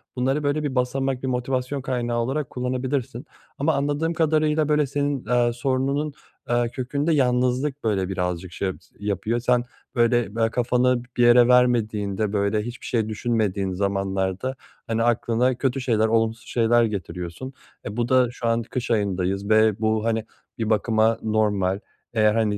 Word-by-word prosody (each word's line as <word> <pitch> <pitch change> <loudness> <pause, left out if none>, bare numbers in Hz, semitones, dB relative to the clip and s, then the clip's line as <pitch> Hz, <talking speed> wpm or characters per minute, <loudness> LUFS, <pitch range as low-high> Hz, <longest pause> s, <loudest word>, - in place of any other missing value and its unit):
bunları 135 +4 0
böyle 145 +2 0
bir 140 -3 -2
basamak, 130 +1 -1
bir 130 - -1
motivasyon 130 +2 -2
kaynağı 120 -2 -2
olarak 135 +4 -2
kullanabilirsin 125 +1 -3 0.3
ama 150 +3 +1
anladığım 145 +4 0
kadarıyla, 155 -1 +2
böyle, 150 -2 +3
senin, 140 -1 -2
eee, 120 +1 +2
sorununun, 135 +4 -1 0.4
eee, 120 0 +2
kökünde 140 +6 -1
yalnızlık, 130 +1 +1
böyle, 100 -4 0
birazcık 90 -1 -3
şey 95 +2 -2
s 95 - -28
yapıyor. 105 +3 -1
Sen, 120 0 +2 0.3
böyle, 120 -3 +2
be 115 -1 +2
kafanı 125 +1 +1
b - - -20
bir 120 - +4
yere 120 0 +7
vermediğinde, 110 -5 +2
böyle, 100 +1 +1
hiçbir 120 +2 -8
şey 110 -3 0
düşünmediğin 105 -4 -1
zamanlarda, 95 +4 -1 0.3
hani, 115 0 0
aklına 120 +2 +1
kötü 135 0 -1
şeyler, 110 -3 +2
olumsuz 115 +1 0
şeyler 120 0 +3
getiriyorsun. 95 +2 -5 0.3
E, 105 +2 -6
bu 120 0 0
da 130 -2 +4
şu 120 - -4
an 115 0 +2
kış 120 +1 -4
ayındayız 100 -1 0
ve 110 -1 +4
bu, 110 0 0
hani, 115 -1 0 0.3
bir 110 -2 -2
bakıma 110 +1 +2
normal, 105 -3 +1 0.3
eğer, 110 -1 +3
hani, 110 -2 +1
120 Hz, 155 wpm, -24 LUFS, 110-130 Hz, 0.4 s, yere